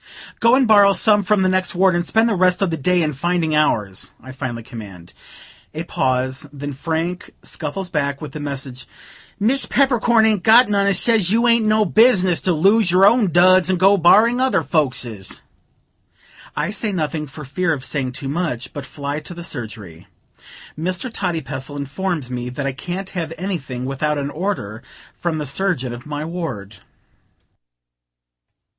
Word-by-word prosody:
"Go 230 +2 +4
and 260 -2 +3
borrow 205 -2 +6
some 210 +2 +4
from 205 0 +1
the - - +2
next 185 0 0
ward, 190 0 +3
and 175 0 0
spend 225 +6 +2
the 230 - +1
rest 185 0 +2
of 185 - 0
the - - -1
day 175 +4 +1
in 150 -1 -1
finding 165 +2 -1
ours," 105 -10 0
I 130 - -11
finally 125 -3 -6
command. 100 -8 -11 0.6
A - - -3
pause; 130 +3 -1
then 145 0 -6
Frank 165 +5 -3
scuffles 175 +5 -5
back 140 -4 -2
with 150 - -8
the 150 - -7
message: 135 -3 -6 0.5
"Miss 245 +7 +3
Peppercorn 240 -4 +3
ain't 215 -4 +2
got 225 +4 +6
none, 200 -1 +1
and 200 - +3
says 215 -2 +3
you 230 +4 +2
ain't 230 -2 +3
no 215 0 +3
business 190 -4 +3
to 185 - +1
lose 195 +5 +3
your 185 +2 +5
own 215 -3 +4
duds 185 +1 +5
and 185 -2 +1
go 195 +2 +5
borrowin' 215 +7 +4
other 255 -10 +1
folkses." 125 - -2 1.1
I - - -2
say 215 0 -2
nothing, 155 -4 -3
for 150 +2 -10
fear 165 +6 -1
of 135 -4 -3
saying 130 -3 -3
too 135 - -6
much, 140 -5 -3
but 145 -2 -7
fly 145 0 -5
to 165 +3 -9
the 170 - -8
surgery. 105 - -8 0.7
Mr. 180 +8 -4
Toddypestle 145 - -4
informs 145 0 -4
me 125 0 -4
that 135 +3 -5
I 140 - 0
can't 180 +7 -6
have 165 -3 -4
anything 155 -9 -4
without 145 +3 -2
an 140 0 -3
order 155 - -4 0.4
from 170 -2 -2
the 150 - -4
surgeon 140 -4 -1
of 120 +4 -10
my 150 0 -4
ward. 155 - -6
165 Hz, 175 wpm, -19 LUFS, 135-195 Hz, 1.1 s, borrow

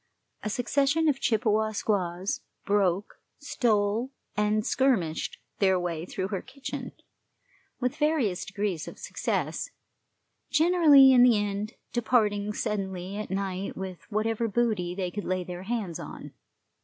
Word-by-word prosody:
A 215 - -3
succession 280 +7 +1
of 280 -3 +2
Chippewa 220 -1 +1
squaws 190 -3 -1 0.2
broke, 200 -1 0 0.2
stole, 225 -3 +1 0.3
and 210 +1 +1
skirmished 210 -13 +1 0.2
their 190 -2 +4
way 170 -1 -3
through 190 0 -3
her 195 -2 -2
kitchen, 275 -1 -7 0.9
with 250 -1 -1
various 295 - +1
degrees 200 -5 -3
of - - -9
success, - - -2 0.8
generally 305 -4 +7
in 250 - +7
the 245 -3 +6
end 205 +1 -2 0.2
departing 210 -4 +2
suddenly 195 -3 -3
at 210 - -5
night 190 0 -3
with 190 -2 -7
whatever 225 +2 0
booty 210 -6 0
they 185 -2 -2
could 205 +2 -4
lay 185 0 -1
their 180 0 -7
hands 210 -7 -3
on. - - -9
210 Hz, 130 wpm, -28 LUFS, 190-240 Hz, 0.9 s, generally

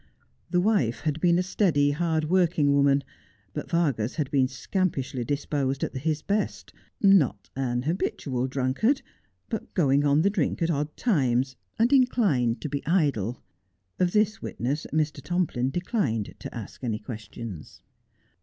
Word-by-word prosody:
The 180 - +2
wife 180 - +1
had 155 0 -2
been 175 -1 +4
a 180 - +2
steady, 160 -7 +2
hard 160 +1 0
working 165 -4 +3
woman, 140 0 +4 0.5
but - - -5
Vargas 140 -9 0
had 150 -4 -2
been 135 -2 +3
scampishly 135 -1 -2
disposed 140 0 -1
at - - -3
his 150 +3 -1
best, 205 +1 -2 0.3
not 190 - +3
an 125 -2 -1
habitual 135 -5 -1
drunkard, 135 - +1 0.4
but 225 - -5
going 140 -5 +3
on 145 +2 +3
the 200 - +3
drink 175 -4 0
at 165 - +2
odd 150 0 -2
times, 130 - +1 0.2
and 235 +5 +3
inclined 195 - +3
to - - -3
be 140 -1 -3
idle. 140 - +1 0.6
Of 180 -1 +2
this 215 +1 +1
witness 140 +6 -3
Mr. 150 -2 0
Tomplin 145 -5 0
declined 140 - -1
to - - -8
ask 110 +3 -9
any 115 -4 -1
questions. 110 -5 -8
145 Hz, 145 wpm, -26 LUFS, 130-175 Hz, 0.6 s, been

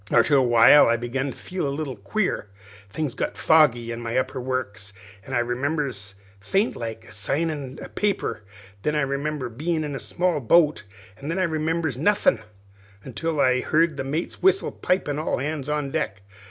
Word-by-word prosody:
"Arter 120 +5 +4
a 135 - +6
while 120 +3 +7
I 115 0 +3
begun 125 +4 -2
to - - -12
feel 180 -5 -4
a - - -1
little 140 -2 -4
queer; 215 - -2 0.4
things 145 +4 -3
got - - -3
foggy 130 -7 +4
in 115 0 -5
my 115 +1 -2
upper 130 0 -1
works, 105 -6 -4 0.3
an' 135 - -3
I - - +3
remembers, 120 -4 -2 0.2
faint 195 - 0
like, 115 -1 -6
of - - -12
signin' 140 - -2
a - - -7
paper; 205 - -1 0.4
then 150 +7 0
I 150 - +2
remembers 140 -1 -2
bein' 155 +6 -1
in 145 -1 -4
a 135 - -4
small 180 -3 0
boat; 150 0 +3 0.4
an' 140 - -7
then 165 +3 -2
I 190 - +2
remembers 160 -4 -1
nothin' 185 - +3 0.6
until 150 +6 -3
I 130 -2 +4
heard 160 +2 +2
the 135 - -3
mate's 150 +6 -3
whistle 385 +1 +3
pipin' 150 -6 -1
all 155 - -1
hands 145 +1 -3
on 150 -2 -1
deck. 105 -11 -3
140 Hz, 180 wpm, -24 LUFS, 120-155 Hz, 0.6 s, while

